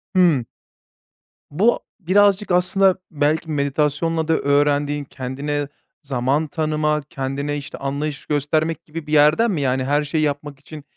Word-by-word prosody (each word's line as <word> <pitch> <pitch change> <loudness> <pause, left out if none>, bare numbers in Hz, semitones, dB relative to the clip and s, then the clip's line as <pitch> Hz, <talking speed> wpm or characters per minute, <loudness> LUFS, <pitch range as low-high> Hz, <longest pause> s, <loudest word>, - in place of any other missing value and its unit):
Hıı. 170 -10 +4 1.1
Bu 205 +11 +2 0.2
birazcık 200 +2 +3
aslında 185 +1 +3 0.2
belki 155 +1 0
meditasyonla 150 +3 0
da 165 - +3
öğrendiğin, 145 0 +1
kendine 140 +2 -4 0.4
zaman 135 +3 0
tanıma, 150 -1 0
kendine 140 +2 -3
işte 140 -1 -8
anlayış 140 +1 -4
göstermek 155 +2 -1
gibi 160 0 -8
bir 150 - -4
yerden 150 +10 +5
mi? 165 -6 -1
Yani, 130 -1 0
her 145 +3 +1
şeyi 155 +2 -1
yapmak 145 -1 -3
için, 150 +1 -11
150 Hz, 130 wpm, -21 LUFS, 140-160 Hz, 1.1 s, yerden